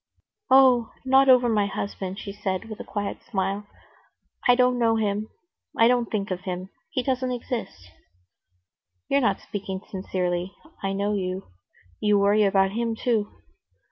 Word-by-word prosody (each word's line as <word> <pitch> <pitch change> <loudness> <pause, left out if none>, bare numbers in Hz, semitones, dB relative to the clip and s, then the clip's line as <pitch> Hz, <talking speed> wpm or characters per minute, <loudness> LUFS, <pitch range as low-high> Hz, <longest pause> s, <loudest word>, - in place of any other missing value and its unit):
"Oh, 255 -3 +6 0.2
not 265 +1 +5
over 250 -1 +6
my 210 -3 +2
husband," 195 -2 -4
she 200 -1 -7
said, 205 +1 -3
with 215 - -7
a - - -5
quiet 205 -1 -4
smile. 195 +1 -2 0.8
"I 245 - +7
don't 250 0 +3
know 230 -1 +3
him, 210 -1 -1 0.5
I 230 - +6
don't 245 -1 +2
think 205 -2 -2
of 180 -1 -3
him. 185 0 -5 0.2
He 275 -6 -2
doesn't 255 -1 -1
exist." 230 - -5 1.2
"You're 280 - +3
not 200 -6 +1
speaking 190 -2 -5
sincerely. 180 -1 -2 0.3
I 195 0 -1
know 200 +1 0
you. 185 - -3 0.5
You 210 -1 +3
worry 205 +1 +4
about 195 -1 +3
him 230 +1 -1
too." 225 -3 0
210 Hz, 150 wpm, -25 LUFS, 195-240 Hz, 1.2 s, I